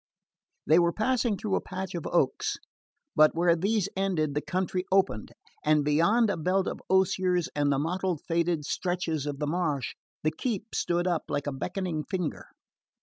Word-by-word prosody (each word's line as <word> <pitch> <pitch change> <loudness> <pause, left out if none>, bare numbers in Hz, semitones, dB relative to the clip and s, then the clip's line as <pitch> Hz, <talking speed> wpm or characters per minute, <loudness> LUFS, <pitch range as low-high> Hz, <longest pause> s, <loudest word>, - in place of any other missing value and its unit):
They 160 +3 +5
were 170 0 +3
passing 225 +1 +1
through 205 -1 -3
a - - +2
patch 190 0 -5
of 170 -3 -4
oaks; 135 -6 +1 0.6
but 155 +1 +5
where 170 0 +4
these 200 +3 +1
ended 180 -7 0
the 150 - 0
country 185 +1 -1
opened, 185 - +1 0.3
and 150 -1 +3
beyond 205 +10 +3
a 190 - -2
belt 185 +4 +1
of - - -4
osiers 185 -2 +2
and 145 -1 +2
the 140 - +2
mottled 175 +2 -1
faded 170 -2 0
stretches 170 -5 -2
of 145 -1 -3
the 150 - -2
marsh 150 -5 -1 0.3
the 155 - +2
keep 220 +5 -4
stood 175 0 0
up 175 -3 0
like 145 - -1
a 145 - -1
beckoning 160 +3 -3
finger. 180 -4 -3
175 Hz, 170 wpm, -28 LUFS, 155-190 Hz, 0.6 s, They